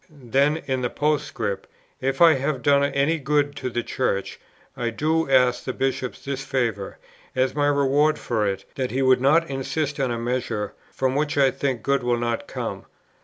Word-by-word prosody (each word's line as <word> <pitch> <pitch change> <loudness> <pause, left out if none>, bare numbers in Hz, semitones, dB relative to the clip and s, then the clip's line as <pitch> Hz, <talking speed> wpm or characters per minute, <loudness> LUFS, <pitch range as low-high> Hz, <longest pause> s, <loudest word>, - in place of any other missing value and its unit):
Then 140 +1 +1
in 130 -2 -1
the 125 - 0
Postscript, 145 -10 -1 0.3
"If 135 +4 +2
I 165 -1 +8
have 135 -2 -2
done 140 -1 +4
any 140 +3 +1
good 145 +1 +1
to 130 - -3
the 120 0 -2
Church, 100 -7 -2 0.4
I 120 -1 -1
do 155 +5 0
ask 125 -2 +3
the 130 - -3
Bishop 130 -1 -2
this 135 -1 -5
favour, 120 -7 -2 0.4
as 130 0 +1
my 145 -1 +1
reward 145 +2 +3
for 110 -3 -1
it, 95 -1 -3
that 130 -2 -2
he 135 +2 0
would 130 -1 +4
not 160 +5 +4
insist 140 +2 -2
on 135 -2 +1
a 120 - -2
measure, 115 -3 -2 0.2
from 130 -1 0
which 145 +1 -1
I 135 -2 +5
think 135 -3 -2
good 140 0 +1
will 120 -1 +1
not 120 -1 -2
come. - - -5
135 Hz, 185 wpm, -24 LUFS, 125-145 Hz, 0.4 s, I